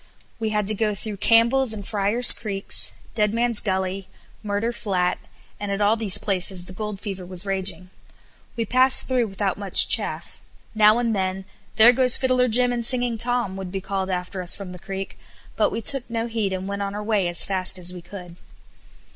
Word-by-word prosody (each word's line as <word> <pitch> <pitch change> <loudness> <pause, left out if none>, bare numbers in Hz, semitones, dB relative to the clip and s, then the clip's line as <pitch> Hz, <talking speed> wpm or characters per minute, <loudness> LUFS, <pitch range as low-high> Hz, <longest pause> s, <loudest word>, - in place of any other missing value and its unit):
We 220 -1 -2
had 210 -1 -1
to 215 - +2
go 215 0 -2
through 210 0 -6
Campbell's 230 +4 +3
and 205 -2 -7
Fryar's 210 +4 +6
Creeks, 200 -3 -1 0.2
Deadman's 230 +1 +1
Gully, 190 -1 -3 0.3
Murder 210 +2 -3
Flat, 190 -6 -2 0.4
and 205 -1 -5
at 200 - -3
all 210 +2 +2
these 215 -5 +2
places 190 -3 -2
the 185 - -11
gold 210 0 -6
fever 190 -3 -7
was 180 +1 -6
raging. 190 -1 -4 0.6
We 230 -2 -2
passed 255 +4 +5
through 250 -3 0
without 195 -1 -3
much 200 -2 +5
chaff; - - -2 0.3
now 215 0 +4
and 235 -2 -1
then, 190 0 -3 0.3
"There 230 +3 +7
goes 250 0 +3
Fiddler 255 -1 +1
Jim 245 +1 +2
and 240 -1 -3
Singing 245 -1 -1
Tom" 240 -4 -1
would 190 -2 -7
be 195 - -4
called 190 0 -4
after 180 0 -4
us 180 - +1
from 195 -3 -8
the 180 - -11
creek, 195 +2 -8 0.4
but - - +1
we 230 - -5
took 270 +1 +2
no 230 0 -3
heed 225 -4 -3
and 190 0 -5
went 200 0 -5
on 200 0 -4
our 210 - -5
way 210 -4 0
as 175 0 +1
fast 190 -1 +1
as 180 0 0
we 180 - -10
could. 175 -1 -12
205 Hz, 195 wpm, -22 LUFS, 190-230 Hz, 0.6 s, There